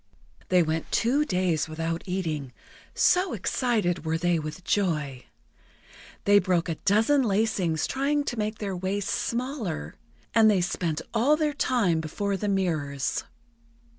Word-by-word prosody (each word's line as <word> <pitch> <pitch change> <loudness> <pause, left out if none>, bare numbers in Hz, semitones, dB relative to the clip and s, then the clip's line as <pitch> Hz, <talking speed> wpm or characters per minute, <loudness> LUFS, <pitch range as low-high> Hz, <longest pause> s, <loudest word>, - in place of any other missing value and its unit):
They 180 -1 +5
went 160 0 -3
two 275 +6 +2
days 180 - 0
without 165 +1 -3
eating, 155 -8 -3 0.4
so 365 0 +3
excited 215 - 0
were 160 0 0
they 175 0 +1
with 155 +3 -7
joy. 150 -11 -1 1.0
They 205 0 +6
broke 180 -3 +1
a 165 - -1
dozen 225 +8 +4
lacings 200 -7 +1
trying 285 +2 0
to 240 -5 -4
make 215 +1 -2
their 200 -3 -3
waists 190 +2 -2
smaller, 235 - -3 0.4
and 220 -1 +6
they 200 -3 +3
spent 170 -3 -2
all 260 +7 +3
their 305 -2 0
time 200 - +1
before 200 +6 -2
the 205 +2 -2
mirrors. 155 -8 -1
190 Hz, 135 wpm, -26 LUFS, 165-225 Hz, 1.0 s, They